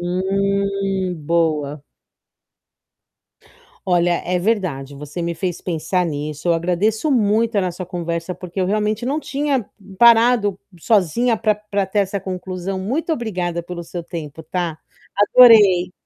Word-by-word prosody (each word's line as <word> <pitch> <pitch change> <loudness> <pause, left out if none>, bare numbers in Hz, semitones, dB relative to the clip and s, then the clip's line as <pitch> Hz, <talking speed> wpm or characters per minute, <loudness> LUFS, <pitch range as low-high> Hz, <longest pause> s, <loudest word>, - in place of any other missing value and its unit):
Hum, 195 +1 -1
boa. 150 -2 -1 2.0
Olha, 175 -1 +2
é 180 0 0
verdade, 175 -10 -1
você 150 +4 -7
me 170 0 -2
fez 180 0 -3
pensar 175 +1 -1
nisso. 150 0 -4
Eu 170 - +5
agradeço 195 - 0
muito 225 -1 +2
a 200 - +3
nossa 180 0 -4
conversa, 170 -1 -4
porque 180 +1 -6
eu 180 - +1
realmente, 215 +3 -1
não 285 +4 0
tinha 280 -6 -1 0.3
parado 230 -4 +5 0.2
sozinha 225 +5 +2
pra 215 -1 +1
pra 205 -2 -3
ter 205 +2 0
essa 195 0 -2
conclusão. 185 0 -5
Muito 270 - -2
obrigada 180 - -3
pelo 175 0 -7
seu 170 +1 -7
tempo, 160 -2 -8
tá. 170 -2 -3 0.4
Adorei. 205 -5 +6
185 Hz, 130 wpm, -20 LUFS, 170-210 Hz, 2.0 s, Adorei